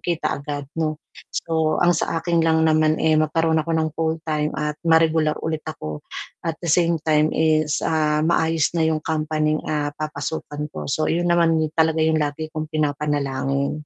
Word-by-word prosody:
kita 170 -4 -2
agad 145 0 -5
'no. 155 -1 -1 0.3
So, 160 -1 0
ang 175 0 +4
sa 165 - -1
akin 170 0 +1
lang 160 0 +3
naman, 155 0 +3
eh, 160 -1 +3
magkaroon 160 +1 +2
ako 165 - -6
ng 160 0 +1
full-time 160 -2 -1
at 150 -1 -2
ma-regular 160 -2 +3
ulit 160 -1 -2
ako 75 - -6 0.4
at 165 -2 -2
the 175 - -6
same 170 +1 +3
time 155 -1 +3
is, 155 -1 +2
ah, 155 -1 +1
maayos 160 -1 +1
na 160 -1 +2
'yong 155 -1 -1
company'ng, 155 -1 0
ah, 145 -1 -1
papasukan 150 0 -4
ko. - - -6
So, 155 +3 0
iyon 175 +1 0
naman 170 -2 +3 0.2
talaga 160 0 +3
yung 160 0 +2
lagi 150 +2 -2
kong 155 0 -4
pinapanalangin. 140 -2 -1
155 Hz, 170 wpm, -22 LUFS, 150-160 Hz, 0.4 s, ang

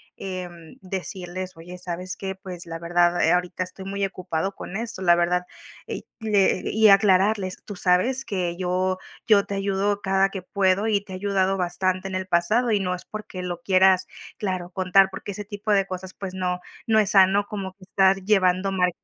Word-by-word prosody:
Em, 175 -4 -7
decirles: 185 0 -5
"Oye, 175 +2 -10
¿sabes 180 +1 -5
que? 190 -1 -4
Pues 185 -2 -7
la 165 -1 -6
verdad, 175 +1 +2
eh, 165 - +4
ahorita 180 +1 0
estoy 185 +1 -10
muy 200 +1 -3
ocupado 185 -1 -3
con 195 - -6
esto, 225 -4 -5
la 175 -2 +5
verdad", 175 +1 +1 0.4
y - - -6
que 205 -4 +2
y 220 0 +5
aclararles, 195 -1 +3
tú 205 - -7
sabes 190 +9 +2
que 180 -4 -2
yo 185 +1 0 0.3
yo 205 -3 +5
te 200 - -4
ayudo 200 +1 0
cada 195 0 +2
que 190 -2 -7
puedo 195 +2 +1
y 205 -2 +2
te 195 - -10
he - - -4
ayudado 195 0 0
bastante 185 +1 -1
en 190 - -5
el 185 0 -3
pasado 215 +8 +2
y 210 - +3
no 180 -2 -1
es 180 - -7
porque 210 -3 -7
lo 175 -1 -5
quieras 185 0 +4 0.3
claro, 185 -3 -3
contar, 185 +1 +3
porque 195 - -7
ese 205 +1 -7
tipo 205 +1 -4
de 195 -2 +3
cosas, 185 0 -6
pues, 195 -2 -7
no, 180 -1 -1 0.3
no 220 -2 +4
es 210 -2 +2
sano, 195 +1 +5
como 195 -3 -5
que 190 0 -19
estás 190 +1 +3
llevando 190 -1 +2
mal. 180 -1 +2
190 Hz, 195 wpm, -24 LUFS, 180-200 Hz, 0.4 s, la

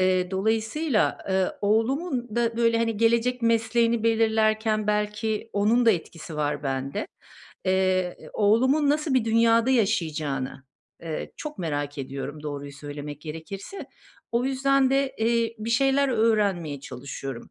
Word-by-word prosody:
Eee, 185 -1 +2
dolayısıyla, 220 +7 0
ııı, 190 -1 0
oğlumun 240 - 0
da, 230 -1 +1
böyle, 230 -1 +3
hani, 230 -2 0
gelecek 235 +2 +2
mesleğini 230 0 +2
belirlerken 220 -1 +2
belki 210 +1 -1
onun 225 +4 +2
da - - +8
etkisi 165 -3 -4
var 150 -1 -1
bende. 135 0 -3 0.6
Eee, 185 -1 +1 0.2
oğlumun 260 +8 +3
nasıl 300 -1 0
bir 255 -4 +3
dünyada 230 +2 +3
yaşayacağını, 155 - -1 0.4
ııı, 160 -2 -4
çok 300 -6 -7
merak 145 -4 -3
ediyorum, 140 +2 -6
doğruyu 145 -1 -6
söylemek 145 0 -8
gerekirse. 170 - -7 0.5
O 235 +1 +1
yüzden 270 0 +2
de, 275 0 +1
eee, 230 0 +1
bir 220 +2 -4
şeyler 270 +3 +3
öğrenmeye 205 - +1
çalışıyorum. 135 -1 -7
220 Hz, 125 wpm, -25 LUFS, 165-235 Hz, 0.6 s, da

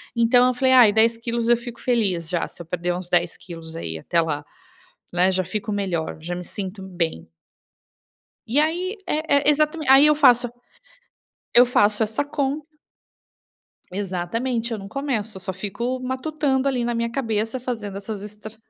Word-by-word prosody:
Então 240 +2 +5
eu 255 - +2
falei: 260 0 +3
"Ai 240 -5 +8
10 230 +1 +3
quilos 235 0 -2
eu 240 - +6
fico 235 0 -9
feliz 195 -10 0
já, 175 -2 -1
se - - -15
eu - - -20
perder 175 +1 -2
uns 180 -1 -5
10 175 -1 +1
quilos 165 -2 -10
aí 80 - -5
até 170 - 0
lá, 150 -2 -2 0.7
né, 180 +2 +3
já 185 0 0
fico 210 +4 -4
melhor, 185 -7 -2
já 175 +2 -4
me 180 - -6
sinto 190 +2 -6
bem." 170 - -3 1.2
E 245 +6 +1
aí, 355 +6 0
é 305 -1 +1
é 280 - -3 0.4
aí 270 +3 +8
eu 300 - +5
faço 250 -4 +5 1.1
eu 245 - +8
faço 210 -3 +3
essa 220 +6 -1
conta 285 0 -2 1.3
exatamente, 225 +6 -2
eu 225 - -2
não 195 0 -9
começo, 225 -5 -2
eu - - -7
só 190 +1 -3
fico 235 +7 -3
matutando 265 +1 -1
ali 250 -3 0
na 240 - -1
minha 230 0 -1
cabeça 225 -1 -2
fazendo 220 -6 -4
essas 200 0 -6
estra 210 +1 -10
225 Hz, 170 wpm, -23 LUFS, 185-255 Hz, 1.3 s, Ai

